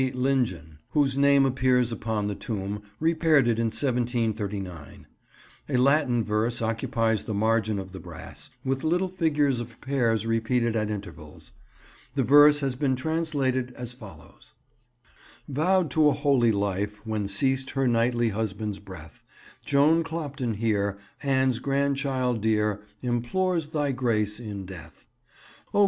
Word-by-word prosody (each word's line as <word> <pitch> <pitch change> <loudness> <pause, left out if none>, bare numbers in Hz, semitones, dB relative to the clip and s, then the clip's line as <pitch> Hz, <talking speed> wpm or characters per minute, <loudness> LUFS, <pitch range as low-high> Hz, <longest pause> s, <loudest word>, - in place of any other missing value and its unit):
Lingen," 115 - -1
whose 140 -3 +2
name 140 0 +5
appears 125 -2 +2
upon 110 -2 -2
the 105 - -1
tomb, 105 -1 -4 0.2
repaired 160 -4 +3
it 115 -1 +1
in 115 - +1
1739. 110 - -2 0.6
A 130 - +1
Latin 130 -2 +3
verse 110 +3 0
occupies 115 -1 0
the 110 - -3
margin 110 0 +1
of 95 -1 -6
the 95 - -8
brass, - - -9 0.2
with 135 0 -1
little 180 +4 +1
figures 150 -7 +1
of 120 -1 -8
pears 120 -5 0
repeated 115 +1 0
at 110 -1 0
intervals. 100 -7 -8 0.6
The - - +2
verse 145 +1 +7
has 135 -2 0
been 130 0 +1
translated 135 -4 -1
as 125 0 -6
follows— 110 -6 -15 0.9
"Vowed 160 +3 +1
to 155 +1 +4
a - - +2
holy 140 -5 +3
life 100 +1 -2
when 110 -2 -2
ceased 130 +7 +1
her 135 -1 +2
knightly 120 0 +2
husband's 105 -1 -3
breath, 95 -6 -12 0.4
Joan 150 +4 +4
Clopton 145 -8 -4
here, 100 -2 0 0.2
Anne's 130 -3 +2
grandchild 135 -3 0
dear, 105 -1 +1 0.2
implores 150 +8 0
Thy 150 -3 -1
grace 110 -5 0
in 105 -5 -6
death; 85 -4 -12 0.7
O! - - +4
120 Hz, 135 wpm, -26 LUFS, 105-140 Hz, 0.9 s, verse